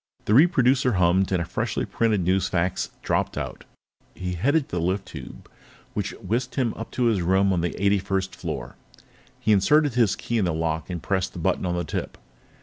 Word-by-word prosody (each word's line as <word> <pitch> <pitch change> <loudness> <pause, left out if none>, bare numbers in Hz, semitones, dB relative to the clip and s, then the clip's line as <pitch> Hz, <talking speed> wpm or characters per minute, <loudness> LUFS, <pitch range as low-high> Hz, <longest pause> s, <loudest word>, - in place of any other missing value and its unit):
The 105 - +2
reproducer 130 -3 +4
hummed, 90 +1 +3
and 90 - +2
a 85 - -2
freshly - - -2
printed 110 -6 0
newsfax 90 -1 0
dropped - - 0
out. - - -5 0.5
He 90 -1 -4
headed 140 - +2
for 90 - -5
the - - 0
lift 95 +3 -1
tube, - - -10 0.5
which - - -2
whisked 120 +6 -3
him 125 -5 +1
up 115 - -7
to 125 - 0
his 110 -6 +2
room 95 +3 +3
on 85 - +1
the 85 - -3
eighty 100 +1 +3
first 95 0 -2
floor. - - -6 0.6
He 110 - +1
inserted 145 +8 +4
his 115 -5 +3
key 120 -1 -2
in 100 - +2
the 85 -3 0
lock 80 0 -2
and 85 -3 -5
pressed 95 -2 -1
the - - -9
button 90 +2 0
on 90 - -1
the 85 - -1
tip. - - -4
95 Hz, 200 wpm, -25 LUFS, 90-115 Hz, 0.6 s, reproducer